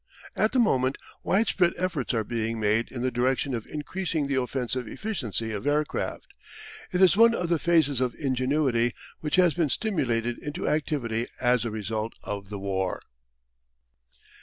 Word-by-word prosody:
At 215 - +2
the 260 - 0
moment 135 - +3 0.2
widespread 185 -3 +2
efforts 175 -8 -1
are 110 - +1
being 115 +1 -2
made 110 +2 +1
in 125 -2 -4
the 130 - +1
direction 130 +2 +1
of 115 -3 -4
increasing 160 0 -2
the 140 -1 +1
offensive 125 -1 -2
efficiency 115 - -3
of 105 +6 -4
aircraft. 150 +1 -1 0.7
It 185 +1 +3
is 185 -2 +6
one 230 +2 +6
of 175 -5 -2
the 170 -2 +2
phases 155 -6 +3
of 125 -2 0
ingenuity 130 -3 +1 0.2
which 150 - -1
has 180 -3 +5
been 165 -4 +1
stimulated 120 - 0
into 150 +4 -4
activity 125 -7 0
as 125 -2 +2
a - - -1
result 110 +1 -3
of 100 -1 -5
the 105 - -5
war. 95 -1 -2
130 Hz, 160 wpm, -27 LUFS, 115-160 Hz, 0.7 s, is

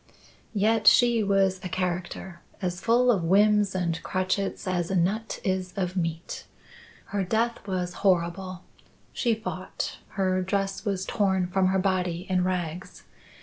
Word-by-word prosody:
"Yet, 215 +2 +2
she 240 -2 +6
was 195 -2 +2
a 180 - -4
character 175 0 -3 0.2
as 180 -2 -3
full 245 +2 +4
of 195 -7 +1
whims 205 +2 +4
and 170 -3 -1
crotchets 185 +1 -2
as 175 -2 0
a 195 - 0
nut 200 +6 0
is 185 -1 -1
of 185 -1 -1
meat. 165 -2 -3 0.7
Her 200 -1 +1
death 225 +3 -1
was 180 -2 -2
horrible. 185 0 0 0.5
She 235 -3 +1
fought 185 -4 -5 0.2
her 185 -1 +2
dress 195 +2 -2
was 195 -2 -1
torn 190 -3 +1
from 185 +1 +1
her 190 +1 +2
body 185 -2 0
in 185 -1 +1
rags. 180 -1 -3
185 Hz, 145 wpm, -26 LUFS, 180-200 Hz, 0.7 s, she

